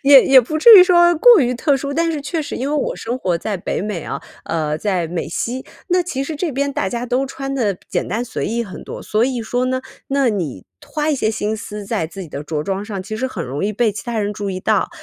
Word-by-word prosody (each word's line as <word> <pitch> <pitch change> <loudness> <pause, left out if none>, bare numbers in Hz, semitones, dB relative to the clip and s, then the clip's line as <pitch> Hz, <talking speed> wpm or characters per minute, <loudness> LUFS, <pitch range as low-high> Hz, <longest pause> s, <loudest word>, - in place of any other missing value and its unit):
也 275 -1 +8
也 265 -1 +7
不 310 +6 -3
至 450 +8 +9
于 360 - +9
说 345 -1 +5
过 475 +6 +7
于 250 -1 +1
特 285 +3 +2
殊， 280 +1 -4
但 330 +1 +1
是 300 - -3
确 315 +2 -3
实 - - -5
因 265 +3 -2
为 300 - +1
我 285 - -1
生 240 +3 -4
活 180 -7 0
在 205 +3 -3
北 175 - -3
美 200 -5 -3
啊， - - -4 0.2
呃， 155 -2 -1
在 180 -1 -1
美 170 +1 -3
西， 245 +9 -3 0.2
那 360 0 +3
其 275 -6 -3
实 305 +2 -4
这 320 -2 -2
边 280 +2 -1
大 190 - -1
家 240 +1 -3
都 255 +3 +1
穿 275 0 -5
得 215 -7 0
简 - - -1
单 220 +6 -2
随 230 - -4
意 235 +2 -1
很 200 - -9
多， - - -7
所 215 +2 +1
以 255 -2 -1
说 245 +3 -1
呢， 255 0 -1 0.3
那 275 -2 +2
你 165 - -3 0.2
花 305 +1 -1
一 - - +2
些 220 -5 0
心 215 0 -2
思 210 -1 -7
在 165 -4 -2
自 190 +3 -8
己 165 - -9
的 145 0 -6
着 150 0 -3
装 195 +3 -2
上， 205 -3 -5
其 215 +3 -6
实 240 +4 -1
很 260 - -5
容 135 +6 -4
易 205 - +1
被 215 0 +1
其 205 - -6
他 235 -2 -3
人 205 0 -1
注 205 -1 -4
意 185 - -3
到。 215 -1 +1
235 Hz, 290 characters per minute, -19 LUFS, 200-275 Hz, 0.3 s, 至